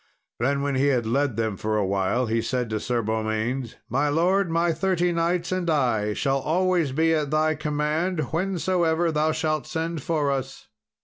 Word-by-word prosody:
Then, 140 +4 +1
when 140 0 0
he 135 +2 +2
had 125 -5 +1
led 135 +2 0
them 110 -3 -1
for 110 +2 -1
a 105 - +1
while, 100 +6 0
he 115 0 0
said 125 0 -2
to 110 - -1
Sir 120 +1 -1
Beaumains, 110 +3 -2
"My 135 +5 +1
lord, 180 +5 +2
my 170 +1 +2
thirty 180 +1 +1
knights 170 +1 0
and 185 -2 -1
I 120 -9 +1
shall 135 +4 0
always 175 0 +1
be 160 +4 +2
at 150 -3 0
thy 155 +1 +2
command 155 +4 -1
whensoever 175 -1 +1
thou 155 0 +1
shalt 155 -1 -1
send 165 0 -3
for 150 -4 0
us." 135 -1 -5
150 Hz, 180 wpm, -25 LUFS, 125-165 Hz, -, he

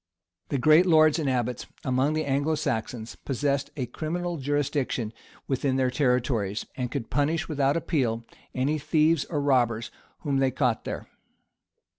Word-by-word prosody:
] 90 -1 -51
The 140 - 0
great 155 +7 +5
lords 155 -1 +5
and 145 -4 0
abbots 125 -1 -1 0.2
among 130 +3 +1
the 155 0 -1
Anglo 140 +3 +1
Saxons 115 -4 -3
possessed 140 +1 -1
a 130 - -1
criminal 170 +7 -3
jurisdiction 140 -5 -1 0.3
within 135 0 0
their 130 -1 +2
territories, 125 -6 0
and 125 -2 -2
could 125 -4 -5
punish 150 +4 +1
without 145 -1 +1
appeal 120 -9 -1 0.3
any 140 +4 +1
thieves 155 +1 +2
or 150 - -2
robbers 120 -5 +1 0.3
whom 140 -3 0
they 135 -1 +3
caught 125 -4 0
there. - - -5
135 Hz, 150 wpm, -26 LUFS, 125-150 Hz, 0.3 s, great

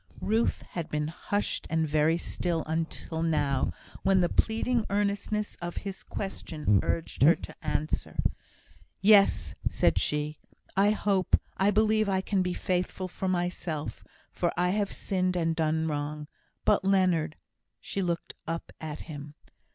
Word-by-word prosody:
Ruth 220 +3 +1
had 170 -3 -5
been 150 0 -1
hushed 205 +5 -2
and 160 -1 +1
very 155 +2 +3
still 170 -1 -1
until 160 0 -3
now, 145 -5 +1 0.3
when 195 -1 +4
the 175 -1 +3
pleading 225 +1 +1
earnestness 205 +1 0
of 175 0 -5
his 195 -1 -5
question 155 - -1
urged 165 - -2
her 155 +5 +8
to - - -9
answer: 155 +1 -2 0.8
"Yes!" 195 - +5 0.2
said - - +2
she. 150 +1 -1 0.4
"I 200 +2 +5
hope 200 -3 +2 0.2
I 195 +1 +3
believe 215 0 +3
I 190 -1 +2
can 195 0 +1
be 180 -1 0
faithful 185 0 -1
for 190 +1 -4
myself, 175 -4 -2 0.3
for 175 - 0
I 180 +1 +3
have 205 0 0
sinned 185 -1 0
and 165 -2 +1
done 160 0 +1
wrong. 150 0 -3 0.4
But - - +4
Leonard 185 -5 +2 0.3
" - - -55
She 200 - -3
looked 170 -2 -2
up 165 +1 -4
at 155 -1 -5
him. 145 -2 -8
175 Hz, 145 wpm, -29 LUFS, 155-195 Hz, 0.8 s, her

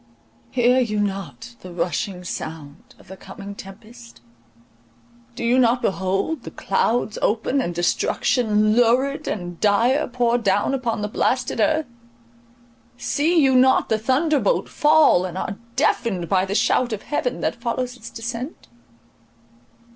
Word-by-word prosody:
Hear 250 +1 +3
you 215 -4 0
not 205 +4 -4
the 185 - -10
rushing 180 +2 -3
sound 155 -4 -8
of - - -20
the 190 - -9
coming 200 +1 -10
tempest? 195 - -13 1.2
Do - - -5
you 240 +2 +3
not 245 0 +3
behold 195 +11 -1
the - - -8
clouds 225 -2 -1
open, 230 +5 +1
and 175 -7 -3
destruction 215 +4 +1
lurid 250 +4 +2
and 175 -4 -4
dire 230 +7 +2
pour 240 -1 +1
down 205 +3 +1
on 230 -3 -1
the - - -1
blasted 250 +4 -1
earth? 315 0 +2 1.1
See 325 +4 +1
you 265 -1 +4
not 260 +1 +4
the 220 - +1
thunderbolt 290 - +1
fall, 300 - +4
and 185 -1 -5
are 200 +2 -4 0.2
deafened 185 -7 0
by 190 0 +2
the 195 +1 -3
shout 245 +2 +2
of 210 - -5
heaven 255 -4 -2
that 235 - -2
follows 245 +1 -2
its 230 -2 -10
descent? 230 - -7
230 Hz, 140 wpm, -22 LUFS, 195-255 Hz, 1.2 s, you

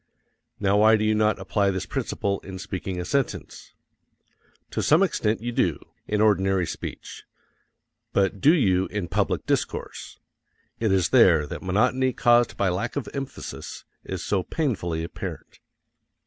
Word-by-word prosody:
Now 100 0 +2
why 110 +2 +6
do 110 - 0
you 110 0 +2
not 110 0 +2
apply 100 +1 0
this 95 -1 -2
principle 100 -1 -2
in 95 0 -9
speaking 95 -1 -5
a 90 - -3
sentence? 140 +4 -3 1.0
To - - -1
some 155 +6 +4
extent 110 - 0
you 120 - -2
do, - - +1 0.3
in 105 0 0
ordinary 95 -3 +3
speech; - - -7 0.9
but 95 -1 +1
do 150 - +6
you 95 - +2
in 105 -4 -4
public - - 0
discourse? - - -3 0.6
It 110 -3 +1
is 95 -2 +2
there 90 - +5
that - - -7
monotony 125 +7 +1
caused 120 0 +3
by 100 - +1
lack 100 +7 -2
of 145 - -3
emphasis 135 -1 -7 0.2
is - - -5
so 100 -2 0
painfully 90 - -2
apparent. 85 - -7
100 Hz, 150 wpm, -25 LUFS, 95-120 Hz, 1.0 s, why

